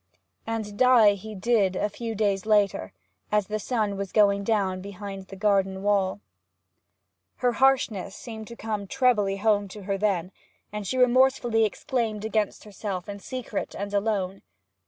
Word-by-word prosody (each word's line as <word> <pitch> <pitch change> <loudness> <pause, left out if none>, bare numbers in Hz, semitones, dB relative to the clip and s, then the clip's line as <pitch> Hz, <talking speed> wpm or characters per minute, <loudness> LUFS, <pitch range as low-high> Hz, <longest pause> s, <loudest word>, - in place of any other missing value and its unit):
And 220 -2 -4
die 245 -5 +6
he 215 +2 -8
did, 200 -2 +2
a 205 - 0
few 225 +2 -5
days 200 -1 0
later, 205 - +2 0.4
as 210 -1 +2
the 215 +2 -3
sun 215 -3 -1
was 195 -1 -4
going 200 -2 +4
down 195 -4 0
behind 195 0 -8
the 195 - -9
garden 195 -1 +1
wall. 200 -1 +1 1.1
Her 250 -1 +1
harshness 240 -7 +2
seemed 220 -3 -8
to 235 - -9
come 215 -3 -4
trebly 215 -6 +2
home 205 -1 +2
to 200 +1 -10
her 195 0 -2
then, 190 -4 0 0.4
and 210 -2 -4
she 260 - -2
remorsefully 250 -2 +4
exclaimed 220 -1 -2
against 215 -2 -1
herself 200 -3 -5
in 200 0 -6
secret 245 -1 -5
and 200 0 -5
alone. 200 -2 -1
210 Hz, 155 wpm, -26 LUFS, 195-225 Hz, 1.1 s, die